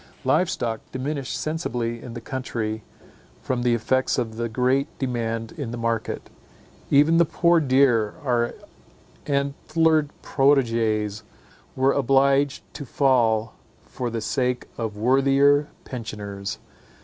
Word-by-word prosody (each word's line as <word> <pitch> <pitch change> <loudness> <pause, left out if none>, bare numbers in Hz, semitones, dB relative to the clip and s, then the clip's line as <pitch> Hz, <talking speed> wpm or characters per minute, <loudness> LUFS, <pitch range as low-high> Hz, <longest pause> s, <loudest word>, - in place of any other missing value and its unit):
Live 155 +7 +2
stock 115 -9 -2
diminished 135 +1 -3
sensibly 120 -7 -3
in 120 -2 -9
the 120 - -6
country, 115 -4 -4 0.6
from 125 -1 -2
the 120 -1 +2
effects 130 +3 +1
of 110 -2 -2
the 115 0 -2
great 130 +4 +1
demand 115 -3 -2
in 145 -8 -5
the 120 - -5
market. 115 -1 -2 0.6
Even 150 +4 +5
the 170 - +6
poor 170 +1 +3
deer, 130 -7 +3
our 120 -3 0 0.7
antlered 150 +2 +1
proteges, 115 -7 +2 0.5
were 135 +1 +3
obliged 135 +1 +2
to 145 - -6
fall 115 -5 +2 0.3
for 125 -1 -4
the 115 -1 -3
sake 125 +2 -1
of 110 -3 -4
worthier 135 +4 +4 0.2
pensioners. 100 -5 -6
125 Hz, 120 wpm, -24 LUFS, 115-140 Hz, 0.7 s, the